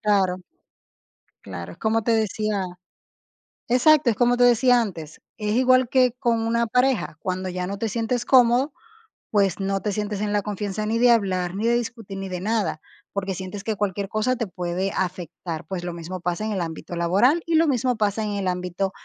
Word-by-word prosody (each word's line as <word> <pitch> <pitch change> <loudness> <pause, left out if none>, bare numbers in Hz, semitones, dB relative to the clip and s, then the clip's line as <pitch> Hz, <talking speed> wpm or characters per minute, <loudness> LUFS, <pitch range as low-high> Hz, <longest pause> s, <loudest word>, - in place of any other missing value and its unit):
claro. 195 -4 +2 1.1
Claro, 90 -3 -7
es 170 - -15
como 225 +2 +1
te 230 - +1
decía 215 -2 0 1.1
exacto, 275 +3 +5
es 225 - 0
como 245 0 +3
te 245 - +3
decía 245 0 +5
antes, 165 -8 -6 0.2
es 210 0 -1
igual 255 0 +4
que 255 0 +3
con 235 -3 +1
una 235 +1 +1
pareja, 250 -6 +1
cuando 185 0 -3
ya 180 0 -3
no 200 - -4
te 225 - -2
sientes 230 +2 -1
cómodo, 255 +2 +4 0.6
pues, 200 -2 +2
no 195 0 0
te 210 - -2
sientes 210 0 -3
en 210 0 -1
la 205 - +2
confianza 205 0 -3
ni 220 +2 0
de 245 +1 +5
hablar, 185 -6 +1
ni 210 +3 -2
de 235 - +3
discutir, 225 -4 -4
ni 195 - -5
de 180 -1 -5
nada, 210 -6 -1 0.3
porque 195 -1 -2
sientes 190 +2 -6
que 220 -1 -2
cualquier 200 -1 -2
cosa 215 +5 0
te 230 -2 -2
puede 180 +1 -3
afectar. 175 -3 -4
Pues, 180 -2 -4
lo 175 - -4
mismo 170 +2 -6
pasa 175 +3 -2
en 220 - -2
el 195 - -1
ámbito 170 0 -5
laboral 200 - +3
y 335 - 0
lo 325 +1 +5
mismo 255 -4 +1
pasa 215 0 0
en 210 - -2
el 200 -2 -1
ámbito 180 +1 -2
210 Hz, 200 wpm, -24 LUFS, 185-235 Hz, 1.1 s, exacto